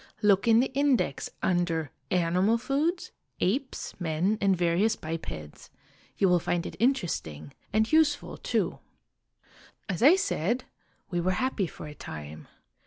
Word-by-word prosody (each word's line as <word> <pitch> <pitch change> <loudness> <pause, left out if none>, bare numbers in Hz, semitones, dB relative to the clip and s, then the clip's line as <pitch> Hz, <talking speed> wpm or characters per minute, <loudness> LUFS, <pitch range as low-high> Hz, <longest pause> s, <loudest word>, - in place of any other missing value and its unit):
Look 200 0 +4
in 230 0 +6
the 260 - -2
index 275 - +1
under 170 -4 0
' 135 - -44 0.2
Animal 185 +7 +2
Foods: 290 +9 -1 0.3
Apes, 260 +9 -1
Men, 175 +6 0
and 195 -2 +3
various 175 +6 +2
Bipeds.' 155 - -7 0.5
You 195 - +3
will 180 -1 +4
find 175 +1 -1
it - - -6
interesting 155 - -1 0.2
and 220 +2 +1
useful 310 -2 +2
too. - - -1 1.1
"As 195 -2 -3
I 295 +9 +8
said, 240 - 0 0.5
we 175 -1 0
were 185 +2 +1
happy 245 -6 0
for - - -10
a 150 - -8
time. 75 - -9
190 Hz, 140 wpm, -28 LUFS, 165-250 Hz, 1.1 s, I